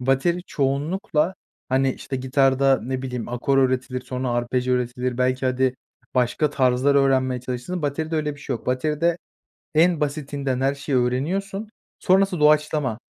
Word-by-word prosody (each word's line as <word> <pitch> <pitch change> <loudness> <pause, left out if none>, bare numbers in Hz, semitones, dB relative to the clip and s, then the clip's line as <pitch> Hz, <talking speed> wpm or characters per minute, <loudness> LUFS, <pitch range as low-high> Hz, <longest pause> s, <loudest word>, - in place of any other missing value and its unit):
bateri 135 +8 +1
çoğunlukla, 150 +5 0 0.3
hani, 130 +1 +2
işte 135 - -5
gitarda 135 +1 +3
ne 130 +2 -3
bileyim 125 -3 -4
akor 125 +3 0
öğretilir 130 -1 +1
sonra 125 0 -3
arpej 120 +1 -1
öğretilir 125 0 -1
belki 130 +1 +1
hadi 130 0 +1 0.4
başka 125 +4 +1
tarzlar 130 0 +2
öğrenmeye 130 -2 +2
çalışırsın. 130 +8 -4
Bateride 155 +3 -2
öyle 150 -1 -1
bir 145 - -15
şey 135 -3 -3
yok. 115 - -17
Bateride 150 +6 0 0.6
en 170 +1 +4
basitinden 140 -3 -2
her 135 +1 +1
şeyi 135 -1 -1
öğreniyorsun 190 - -1 0.3
sonrası 190 -1 +3
doğaçlama. 150 -5 +2
135 Hz, 140 wpm, -23 LUFS, 125-150 Hz, 0.6 s, en